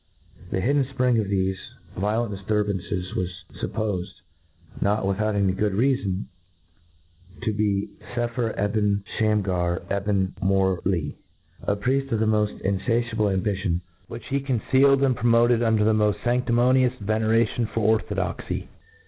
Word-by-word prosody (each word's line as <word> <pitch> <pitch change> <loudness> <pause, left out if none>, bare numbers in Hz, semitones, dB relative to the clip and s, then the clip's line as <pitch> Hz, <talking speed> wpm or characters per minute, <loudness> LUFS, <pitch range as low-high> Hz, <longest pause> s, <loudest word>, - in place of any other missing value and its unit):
' 90 - -20
The 95 - 0
hidden 140 +6 +2
fpring.of 125 -5 +1
thefe 95 -1 0 0.4
violent 105 +3 -1
difturban 100 0 -1
«s 90 -3 -4
waB 90 - 0 0.3
fuppofed, 105 -5 -2 0.7
not 105 +1 +1
v^rithout 100 -1 +1
good 105 -1 +1
rcafon, 105 -4 +1 1.2
to 110 - 0
be 105 -1 0 0.3
9epher 120 -1 -1
Ebn 105 -1 +1 0.2
Shamgar 95 -5 +1
Ebn 100 -1 0
Mourli 95 -3 +1 0.3
— - - -20
^a 100 - +2
prieft 135 +6 -1
of 115 - +1
the 110 - +2
moft 105 -1 +1
in&tiable 110 +2 0
ambition, 95 -2 -1 0.3
which 115 - -8
he 140 - +1
concealed 135 +1 +3
and 130 -2 +3
promoted 120 +1 +3
under 110 -2 +3
the 110 +1 +3
moft 105 -1 +2
fandimonious 125 +1 +2
veneration 110 +2 +1
for 115 +1 -3
orthodoxy. 105 -3 -1
105 Hz, 130 wpm, -24 LUFS, 100-115 Hz, 1.2 s, concealed